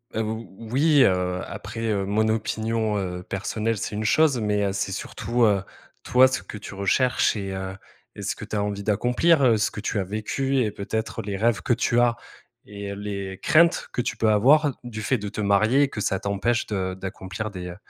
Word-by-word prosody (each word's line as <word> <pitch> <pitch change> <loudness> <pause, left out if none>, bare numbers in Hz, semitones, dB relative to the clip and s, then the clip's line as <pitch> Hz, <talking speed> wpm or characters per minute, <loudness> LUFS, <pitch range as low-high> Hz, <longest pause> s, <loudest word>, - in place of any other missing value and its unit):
Heu, 110 - +1
ou 110 +1 -4 0.2
oui, 145 +1 +5
heu, 90 -2 +1
après, 115 - -7
heu, 100 -2 0
mon 110 +2 +1
opinion, 110 0 -1
heu, 90 -2 -4
personnelle 110 +4 -2
c'est 105 - -4
une 110 +1 -2
chose, 145 0 +3
mais, 105 -1 0
heu, 100 - 0
c'est 100 0 -2
surtout, 120 +4 -2
heu, 100 -3 +2 0.4
toi 130 +1 +6
ce 130 - -3
que 105 - -8
tu 100 - -9
recherches 120 +8 +2
et 100 -2 -4
heu 95 0 -5 0.4
et - - -8
ce - - -2
que - - -8
tu - - -5
as 100 - +1
envie 100 0 -3
d'accomplir, 125 - +3
heu, 115 -3 +5
ce 105 - +1
que 105 - -7
tu 105 - -1
as - - 0
vécu 130 +7 -1
et 105 - -1
peut-être 110 +2 -4
les 100 -1 -4
rêves 115 +1 +1
que 120 - +1
tu 120 +1 +1
as 120 -1 +3 0.5
et 100 -1 -7
heu, - - -7
les 100 -2 -5
craintes 170 +2 +4
que 125 - -1
tu 115 - -3
peux 110 0 +1
avoir 140 +8 +5
du 110 -3 -6
fait 125 +4 +1
de 105 0 -5
te 105 - -5
marier 110 +7 +3
et 140 - +1
que 110 - -6
ça 95 -2 0
t'empêche 100 +4 0
de 95 -3 -2
d'accomplir 95 +2 -6
des, 90 -2 -6
heu, 85 - -7
105 Hz, 220 wpm, -24 LUFS, 100-120 Hz, 0.5 s, toi